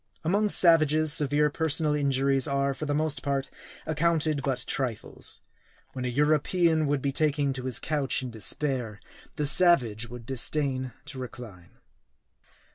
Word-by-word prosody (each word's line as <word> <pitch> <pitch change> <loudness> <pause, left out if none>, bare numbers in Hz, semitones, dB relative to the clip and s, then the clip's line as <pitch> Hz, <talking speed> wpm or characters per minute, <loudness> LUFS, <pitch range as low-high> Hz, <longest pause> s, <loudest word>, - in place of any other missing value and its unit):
Among 205 +6 +1
savages, 155 -4 +4
severe 150 -1 +2
personal 160 -1 +1
injuries 135 -2 +1
are, 140 0 0
for 140 +3 -6
the 145 - 0
most 155 -1 -1
part, 135 -1 -2 0.3
accounted 155 -1 +1
but 135 -1 -2
trifles. 125 -5 -2 0.5
When 130 -1 -4
a - - 0
European 155 +4 +2
would 140 -2 -1
be 140 - 0
taking 145 -1 0
to 130 -1 -7
his 130 -2 -2
couch 145 -4 -1
in 125 - -5
despair, 115 0 -3 0.4
the 150 - -1
savage 125 - +3
would 120 -1 -10
disdain 130 0 -2
to 145 -3 -9
recline. 115 -8 -10
140 Hz, 140 wpm, -27 LUFS, 130-155 Hz, 0.5 s, savages